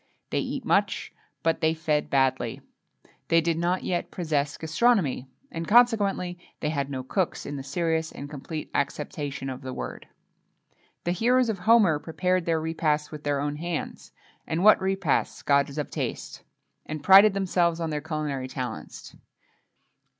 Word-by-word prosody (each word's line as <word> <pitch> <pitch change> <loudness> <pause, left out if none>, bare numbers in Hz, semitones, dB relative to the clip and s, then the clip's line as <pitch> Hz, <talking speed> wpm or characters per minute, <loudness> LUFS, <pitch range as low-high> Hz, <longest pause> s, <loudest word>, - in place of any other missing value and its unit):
They - - +1
eat - - -4
much, - - +1 0.3
but 165 0 +1
they 160 0 +2
fed 155 -2 0
badly. 130 -4 +1 0.7
They 165 - +4
did 165 0 0
not 175 +2 0
yet 175 -1 -2
possess 150 -5 -1
gastronomy; 160 - +1 0.2
and, 165 -8 -5
consequently, 205 -6 +3 0.2
they 150 - -1
had 140 -3 -2
no 130 -2 -4
cooks, 180 +7 -2
in 145 - -5
the 135 - -5
serious 160 +3 -1
and 140 - -8
complete 150 +2 -7
acceptation 140 -1 -3
of 130 0 -5
the 130 -1 -6
word. - - -6 1.0
The 175 - 0
heroes 240 +6 +2
of 205 -4 -2
Homer 195 -6 +4
prepared 180 +2 -1
their 165 -1 +2
repasts 155 -2 -1
with 150 -1 -8
their 145 -1 0
own 145 +1 -2
hands, 170 0 -5 0.4
and 165 +3 -1
what 215 - +7
repasts, 190 -5 0
gods 140 0 +2
of 150 - -3
taste! - - -4 0.4
and 155 -1 -6
prided 195 +1 +8
themselves 175 -3 +1
on 165 -1 -2
their 150 -1 -2
culinary 150 -4 -3
talents. 125 -4 -7
160 Hz, 155 wpm, -26 LUFS, 145-180 Hz, 1.0 s, prided